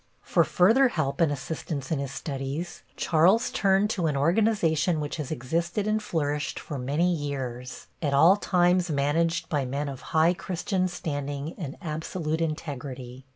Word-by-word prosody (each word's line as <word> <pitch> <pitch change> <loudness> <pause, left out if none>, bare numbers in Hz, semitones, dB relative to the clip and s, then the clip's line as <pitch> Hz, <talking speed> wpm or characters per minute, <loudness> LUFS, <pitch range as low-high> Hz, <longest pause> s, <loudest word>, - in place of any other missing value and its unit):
For - - +3
further 225 +9 +4
help 155 - -2
and 160 -3 +4
assistance 145 0 -4
in 155 - +1
his 140 -1 -3
studies, 140 +5 -5
Charles 175 +8 +3
turned 195 +1 +2
to 175 -6 0
an 145 -3 0
organization 170 -1 +2
which 150 +1 -3
has 150 -4 -4
existed 170 - -1
and 215 0 +1
flourished 150 -6 -2
for 145 - -6
many 150 +8 +1
years, 130 -5 -5 0.2
at 145 -4 0
all 160 +7 +6
times 180 -2 +2
managed 160 +4 +1
by 145 -3 0
men 140 +3 -2
of 135 -2 -6
high 160 +2 +4
Christian 185 +1 -1
standing 145 -3 -4
and 150 -7 -6
absolute 160 0 -3
integrity. 135 -5 -5
155 Hz, 155 wpm, -27 LUFS, 140-175 Hz, 0.2 s, all